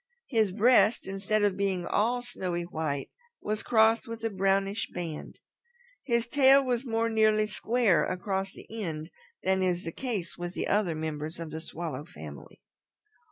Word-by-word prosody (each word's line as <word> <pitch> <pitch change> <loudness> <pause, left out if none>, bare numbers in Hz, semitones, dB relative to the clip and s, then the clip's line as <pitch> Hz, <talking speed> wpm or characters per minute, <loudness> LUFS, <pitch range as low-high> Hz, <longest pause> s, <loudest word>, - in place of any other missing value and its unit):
His 220 -6 +2
breast, 220 +1 +4
instead 195 +2 0
of 205 -2 +2
being 190 -3 -1
all 240 +7 +1
snowy 180 -7 -3
white, 155 -5 -3 0.3
was 215 0 -2
crossed 225 +1 +3
with 230 0 -7
a 225 - 0
brownish 195 +2 +1
band. 165 -4 -6 0.7
His 235 -3 +1
tail 270 +2 +6
was 245 -1 0
more 230 -2 0
nearly 215 -1 +3
square 220 -2 +2
across 190 +1 -2
the - - -13 0.2
end 160 -3 -4 0.3
than 190 0 +2
is 180 -1 0
the 165 - -4
case 205 -7 -4
with 175 +1 -5
other 195 -5 +1
members 155 0 -4
of 165 -2 -6
the 160 +1 -5
Swallow 160 -4 -6
family. 75 - -11
195 Hz, 155 wpm, -29 LUFS, 170-225 Hz, 0.7 s, tail